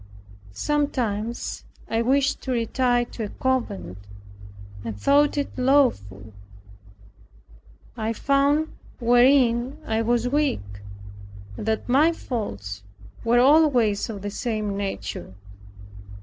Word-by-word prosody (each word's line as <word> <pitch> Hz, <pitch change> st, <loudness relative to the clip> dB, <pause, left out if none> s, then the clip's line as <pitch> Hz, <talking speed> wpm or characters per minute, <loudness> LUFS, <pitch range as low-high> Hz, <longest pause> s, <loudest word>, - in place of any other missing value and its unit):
Sometimes 240 Hz, -, -2 dB, 0.2 s
I 225 Hz, 0 st, 0 dB
wished 275 Hz, +3 st, +1 dB
to 260 Hz, -, -4 dB
retire 245 Hz, +1 st, +1 dB
to 230 Hz, -2 st, -6 dB
a -, -, -6 dB
convent, 100 Hz, -, -2 dB, 0.8 s
and 110 Hz, -3 st, -6 dB
thought 290 Hz, -, +3 dB
it 285 Hz, -, -2 dB
lawful. 110 Hz, -, +1 dB, 1.6 s
I 220 Hz, -1 st, -2 dB
found 280 Hz, +6 st, +1 dB, 0.3 s
wherein 245 Hz, +1 st, +3 dB
I 225 Hz, 0 st, 0 dB
was 240 Hz, +1 st, +1 dB
weak, 245 Hz, -, -1 dB, 0.7 s
and 210 Hz, -, -7 dB
that 220 Hz, 0 st, -1 dB
my 295 Hz, +7 st, +4 dB
faults 100 Hz, -, -5 dB, 0.4 s
were 235 Hz, +1 st, +3 dB
always 255 Hz, -8 st, +4 dB
of 200 Hz, -3 st, -6 dB
the 205 Hz, -, -4 dB
same 215 Hz, -2 st, -3 dB
nature. 100 Hz, -, -5 dB
235 Hz, 105 wpm, -24 LUFS, 205-270 Hz, 1.6 s, my